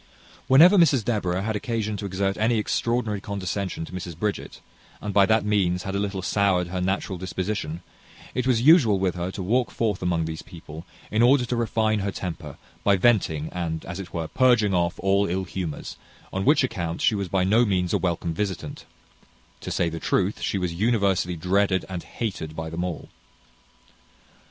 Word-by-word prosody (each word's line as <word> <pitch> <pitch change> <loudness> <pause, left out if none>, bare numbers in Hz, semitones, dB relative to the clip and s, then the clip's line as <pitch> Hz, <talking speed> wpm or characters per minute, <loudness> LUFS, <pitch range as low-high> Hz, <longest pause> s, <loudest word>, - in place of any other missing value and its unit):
Whenever 170 +9 +7
Mrs 135 -9 +4
Deborah 95 -5 -1
had 110 0 -2
occasion 110 -1 -2
to 100 0 -4
exert 95 +1 -1
any 115 +2 +2
extraordinary 110 -1 -1
condescension 100 -3 -3
to - - -13
Mrs 90 -3 -6
Bridget, 105 +2 -3 0.4
and 105 - -5
by 100 -1 +5
that 110 -1 +2
means 95 -4 +1
had 95 - -4
a 100 - 0
little 100 -2 -3
soured 95 -3 +1
her 90 0 -3
natural 95 0 -2
disposition, 95 -2 -4 0.5
it 125 0 -1
was 120 -3 +2
usual 135 - +6
with 95 -2 0
her 90 0 -3
to 95 0 -5
walk 120 +6 +1
forth 105 -4 -1
among 85 -2 0
these 80 -1 -5
people, 85 -2 -11 0.2
in 110 - +2
order 125 +1 +5
to 120 - -2
refine 110 -2 +1
her 100 0 -2
temper, 90 -4 -6 0.3
by 100 - +4
venting, 90 -8 +2
and, 80 -2 -4
as 85 +2 -6
it 95 -3 -7
were, 80 -2 -3
purging 120 -5 +3
off 85 -1 +1
all 100 +1 +2
ill 95 +2 -1
humours; 90 -4 -5 0.4
on 95 0 -2
which 145 0 +5
account 85 -9 -3
she - - +3
was 100 -2 -2
by 95 +1 +1
no 110 +6 +4
means 90 -5 0
a - - +2
welcome 85 -2 -1
visitant: 90 -5 -4 0.7
to - - -7
say 85 - 0
the 85 0 -4
truth, 95 +4 0
she - - -1
was 90 -3 -2
universally 100 -3 +1
dreaded 95 +3 +1
and 90 -2 -5
hated 90 -9 -5
by 80 0 -5
them 85 +2 -3
all. 90 -3 -5
95 Hz, 185 wpm, -25 LUFS, 90-110 Hz, 0.7 s, Whenever